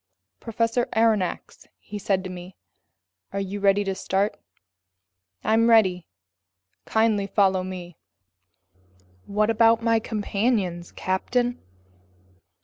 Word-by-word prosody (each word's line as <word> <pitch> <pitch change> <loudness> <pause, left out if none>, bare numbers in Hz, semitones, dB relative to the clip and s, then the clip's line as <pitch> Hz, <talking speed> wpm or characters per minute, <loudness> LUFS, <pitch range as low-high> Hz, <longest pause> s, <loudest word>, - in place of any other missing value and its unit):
"Professor 230 +1 -1
Aronnax," 220 -5 0
he 205 0 -8
said 195 -2 0
to 185 - -6
me, 180 +1 -10 0.8
"are 200 - -3
you 195 +1 -4
ready 200 0 +3
to 195 -1 -2
start?" 195 +2 -1 1.1
"I'm 225 +1 +3
ready." 185 -7 +4 0.8
"Kindly 220 -3 +1
follow 190 -2 +2
me." 180 -2 -8 1.3
"What 210 +2 +1
about 230 0 +4
my 230 -1 +3
companions, 205 -5 -1
captain?" 245 +6 -1
205 Hz, 100 wpm, -24 LUFS, 190-225 Hz, 1.3 s, ready